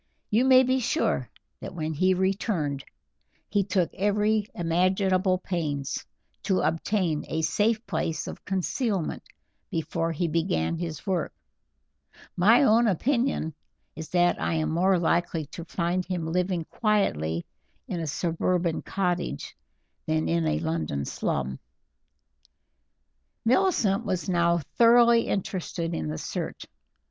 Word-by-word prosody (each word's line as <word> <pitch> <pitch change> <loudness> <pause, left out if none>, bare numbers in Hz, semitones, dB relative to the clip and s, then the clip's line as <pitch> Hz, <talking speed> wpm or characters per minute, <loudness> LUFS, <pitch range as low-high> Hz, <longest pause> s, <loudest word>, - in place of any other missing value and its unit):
You 230 +5 +3
may 260 -1 +7
be 260 +1 +2
sure 260 +6 0 0.3
that - - -8
when 160 -1 -2
he 185 +5 +2
returned 180 - -1 0.6
he 205 -1 +1
took 185 -3 0
every 210 +1 +1
imaginable 185 +2 +2
pains 150 -7 -3 0.4
to 190 -2 +1
obtain 165 -2 0
a 160 0 -2
safe 215 +7 +1
place 160 - -2
of - - -8
concealment 195 - -1 0.5
before 165 0 -2
he 170 +2 -1
began 155 - 0
his 165 -3 -5
work; 185 -5 -1 1.0
my 220 +9 +5
own 230 -1 +5
opinion 235 - 0 0.4
is 160 +1 -7
that 175 -1 +2
I 165 - 0
am 155 -1 0
more 185 +3 +3
likely 170 -1 0
to 170 - -7
find 175 +1 -1
him 180 -3 -3
living 175 0 -1
quietly 85 - 0 0.4
in 175 - -3
a 165 - -3
suburban 170 +3 0
cottage 180 - -2 0.5
than 80 +1 +1
in 80 -1 +1
a 75 0 +1
London 80 -4 -2
slum." 65 -1 -2 1.9
Millicent 240 - +2
was 185 -5 -2
now 170 -2 +2 0.2
thoroughly 235 0 +6
interested 175 -3 -2
in 80 - -2
the 75 +1 -3
search. - - -5
175 Hz, 125 wpm, -26 LUFS, 160-205 Hz, 1.9 s, may